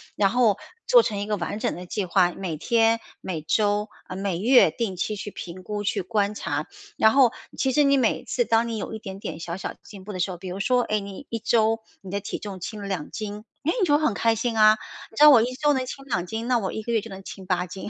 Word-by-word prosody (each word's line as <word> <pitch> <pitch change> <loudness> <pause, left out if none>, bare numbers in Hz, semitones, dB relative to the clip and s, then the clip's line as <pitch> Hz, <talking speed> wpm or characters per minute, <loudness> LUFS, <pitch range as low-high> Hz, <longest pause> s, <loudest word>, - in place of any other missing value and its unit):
然 200 -1 +3
后 230 -3 +3 0.3
做 - - +7
成 210 - -2
一 200 - -2
个 210 0 -1
完 185 +3 -3
整 - - -1
的 180 +1 -8
计 205 0 -2
划， 180 0 +3
每 180 -5 -4
天、 230 +6 +2 0.2
每 175 -4 -4
周， 205 +5 +1 0.2
啊， 185 - -7
每 190 -2 -2
月 245 +6 +6
定 225 -6 -3
期 210 +4 -2
去 205 0 -6
评 185 0 -8
估、 210 +1 -4
去 205 -1 -1
观 210 +1 0
察。 - - -3 0.3
然 220 - +5
后 260 -3 +5 0.3
其 265 - +1
实 295 +3 +4
你 275 -1 +4
每 245 - +1
次 485 - 0
当 225 - +2
你 230 -1 -3
有 215 - -5
一 220 - -5
点 195 -2 -8
点 180 - -6
小 170 +1 -5
小 - - -4
的 - - -11
进 200 -3 -12
步 210 +2 -7
的 185 - -5
时 180 - +1
候， 180 - -5
比 185 +1 -9
如 185 - -5
说， 250 +5 +2
哎， 215 -2 0
你 200 +6 -8
1 230 - -3
周 225 0 +2 0.2
你 190 -1 -9
的 200 - -1
体 200 - -5
重 200 -3 -7
轻 210 +4 -6
了 200 - -5
2 180 -6 -3
斤。 210 +3 -6 0.2
哎， 330 - +2
你 375 - +4
就 290 -2 +4
会 310 - -3
很 230 - +2
开 230 +2 +2
心 230 0 -2
啊。 215 0 +7 0.3
你 220 - -18
知 - - 0
道 300 - +11
我 255 -6 +8
1 245 +3 -1
周 295 +3 +2
能 260 -1 -1
轻 275 +2 -8
2 205 -10 -1
斤， 220 +5 -4
那 250 - +3
我 195 -4 -2
1 220 - -4
个 235 +2 -3
月 225 - +2
就 225 - -10
能 195 -1 -8
轻 190 0 -9
8 180 -1 0
斤， 190 +3 -7
210 Hz, 280 characters per minute, -25 LUFS, 190-230 Hz, 0.3 s, 道